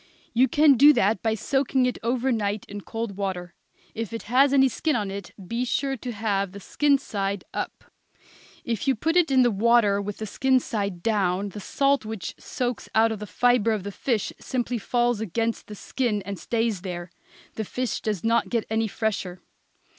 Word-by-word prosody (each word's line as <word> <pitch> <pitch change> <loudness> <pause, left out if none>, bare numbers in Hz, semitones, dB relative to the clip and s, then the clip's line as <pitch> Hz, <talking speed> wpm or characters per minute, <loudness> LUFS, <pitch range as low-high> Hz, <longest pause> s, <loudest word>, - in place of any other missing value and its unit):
You 250 +3 +4
can 290 +1 +5
do 290 +4 +8
that 220 -3 +2
by 220 -1 +1
soaking 265 +3 +1
it 250 - -1
over 250 +3 0
night 210 -3 -1
in 205 0 -7
cold 225 -1 -5
water; 180 -3 -3 0.4
if 225 -2 -4
it 230 - -5
has 265 +5 +4
any 270 -1 +5
skin 300 +4 -1
on 205 -4 -1
it 200 -2 -7 0.2
be 235 +4 -1
sure 270 +2 0
to 250 0 -6
have 200 -3 -1
the 200 - -8
skin 285 +7 +2
side 200 -7 -3
up. - - -4 0.8
If 230 0 -3
you 270 - +4
put 325 +9 -1
it 350 -3 +4
in 260 -2 +5
the 240 - +3
water 210 -1 +3
with 205 0 -5
the 220 - -4
skin 260 +5 +2
side 200 -7 -3
down, 200 -3 +1
the 210 - -8
salt 275 +6 +1
which 215 -4 -5
soaks 245 -2 -3
out 225 +1 +5
of 220 - -4
the 210 - -6
fibre 245 0 +3
of 210 -4 -3
the 200 - -5
fish 225 0 -1
simply 245 -2 -2
falls 240 +1 +1
against 225 +3 -2
the 210 - -8
skin 210 0 -2
and 200 0 -6
stays 225 -5 -1
there. 175 -2 -6 0.4
The 220 - -3
fish 250 +4 -3
does 210 -5 -2
not 230 +1 +2
get 230 -3 0
any 220 0 +1
fresher. 195 -4 -3
225 Hz, 195 wpm, -25 LUFS, 200-250 Hz, 0.8 s, do